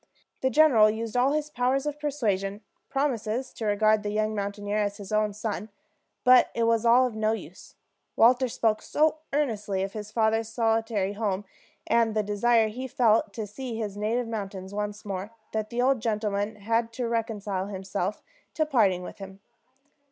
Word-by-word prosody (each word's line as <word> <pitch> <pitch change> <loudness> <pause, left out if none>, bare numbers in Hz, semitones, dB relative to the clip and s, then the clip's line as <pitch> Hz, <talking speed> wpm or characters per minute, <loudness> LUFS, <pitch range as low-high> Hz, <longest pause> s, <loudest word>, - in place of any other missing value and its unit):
The 260 - +2
general 260 -7 +6
used 220 +1 -4
all 255 +3 +3
his 300 0 -2
powers 260 +2 0
of 295 0 -3
persuasion, 210 -9 -1 0.3
promised 255 -3 -1
to 225 - -4
regard 215 +1 +3
the 205 - -3
young 215 +1 0
mountaineer 205 0 -2
as 205 -1 -1
his 200 -2 -9
own 215 0 +2
son; 215 +1 -4 0.5
but 250 0 +6
it 235 - +1
was 230 0 +2
all 245 +2 +6
of 250 - -3
no 220 0 +1
use. 225 - -9 0.4
Walter 250 +3 +5
spoke 220 -2 0
so 310 +1 +1
earnestly 210 -9 -1
of 195 0 -4
his 210 -1 -7
father's 225 0 +1
solitary 225 -3 0
home, 205 -2 -2 0.4
and 230 -2 +2
the 215 - +2
desire 220 +2 +3
he 255 +4 -5
felt 225 -4 +2
to 220 0 -4
see 235 +3 -6
his 210 -3 -4
native 225 +4 -1
mountains 195 -3 -5
once 210 0 -4
more, 195 0 -4 0.2
that 215 -1 -2
the 245 +1 0
old 265 -1 +3
gentleman 210 -1 -1
had 225 +2 -1
to 245 0 -2
reconcile 210 -4 -2
himself 195 0 -4 0.3
to 310 - +2
parting 205 -11 +2
with - - -9
him. 195 0 -9
220 Hz, 175 wpm, -27 LUFS, 205-240 Hz, 0.5 s, general